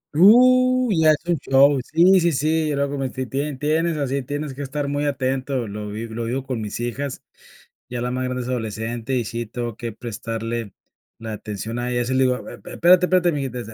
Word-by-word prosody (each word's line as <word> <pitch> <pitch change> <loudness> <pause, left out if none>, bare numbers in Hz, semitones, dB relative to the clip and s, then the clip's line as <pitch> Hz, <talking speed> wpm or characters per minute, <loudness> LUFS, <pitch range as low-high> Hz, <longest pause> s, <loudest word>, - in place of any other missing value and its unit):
Uh, 255 +6 +6
ya 160 -3 +4
es 150 - -5
un 175 -2 +2
show. 135 +1 +4
Sí, 180 +4 +6
sí, 170 0 +2
sí, 155 +3 +1
yo 145 - 0
lo 140 0 +1
cometí, 135 -2 -3
tie 140 +3 -3
tienes 155 +4 0
así, 140 -1 -1
tienes 145 +2 -4
que 140 - -8
estar 140 +1 -3
muy 145 +1 -1
atento, 130 -2 -1
lo 105 +1 -6
vi 110 +3 -5
lo 115 +1 -5
vivo 125 +3 -2
con 125 -4 -3
mis 105 +1 -5
hijas, 130 +3 -4 0.7
ya 120 -1 -4
la 125 +1 -2
más 130 0 -2
grande 125 0 -3
es 120 - -7
adolescente 115 +1 -3
y 120 -2 0
sí, 115 +2 -4
tengo 120 0 -5
que 120 -1 -5
prestarle 115 -1 -5 0.5
la 110 -1 -6
atención 105 +2 -5
a 120 0 -2
ella, 120 0 0
así 125 +2 -2
le 130 0 +3
digo, 125 -1 -1
e - - -8 0.2
espérate, 180 +1 +5
espérate, 180 -2 +3
mijita, 135 -4 -3
130 Hz, 210 wpm, -22 LUFS, 120-150 Hz, 0.7 s, Uh